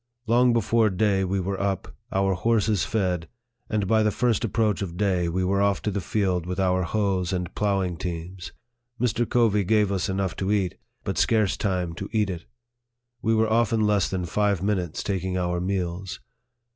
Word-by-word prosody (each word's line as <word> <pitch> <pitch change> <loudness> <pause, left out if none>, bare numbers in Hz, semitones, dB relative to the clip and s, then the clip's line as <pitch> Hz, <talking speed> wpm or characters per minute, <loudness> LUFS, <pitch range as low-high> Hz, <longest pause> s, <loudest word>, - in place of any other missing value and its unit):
Long 120 +2 +4
before 115 -1 +3
day 100 0 +1
we 95 +1 0
were 95 +1 -2
up, 100 -2 -2 0.2
our 95 0 +2
horses 105 -1 +1
fed, 90 -6 -1 0.4
and 105 -3 0
by 110 +2 +3
the 105 - +3
first 120 +1 +1
approach 110 -2 +1
of 90 -3 -4
day 90 -4 +1
we 90 +2 -1
were 100 +1 +1
off 100 -1 +2
to 105 - 0
the 100 0 -2
field 90 -2 0
with 90 +1 -3
our 95 -1 +2
hoes 95 -2 0
and 90 -2 -3
ploughing 95 -4 0
teams. 90 +1 -6 0.5
Mr. 120 -1 0
Covey 110 -4 +3
gave 105 +1 +2
us 95 -1 -1
enough 95 -1 -1
to 95 +1 -1
eat, 95 -4 +1 0.3
but - - -2
scarce 110 -4 +2
time 90 -4 -1
to 100 +4 -6
eat 105 -3 +1
it. 85 -2 -7 0.8
We 115 0 +2
were 110 0 +2
often 115 -1 +2
less 105 -2 +2
than 90 -2 -2
five 100 0 0
minutes 95 -6 -1
taking 95 -2 -2
our 90 -1 -1
meals. 90 0 -3
100 Hz, 185 wpm, -25 LUFS, 90-105 Hz, 0.8 s, Long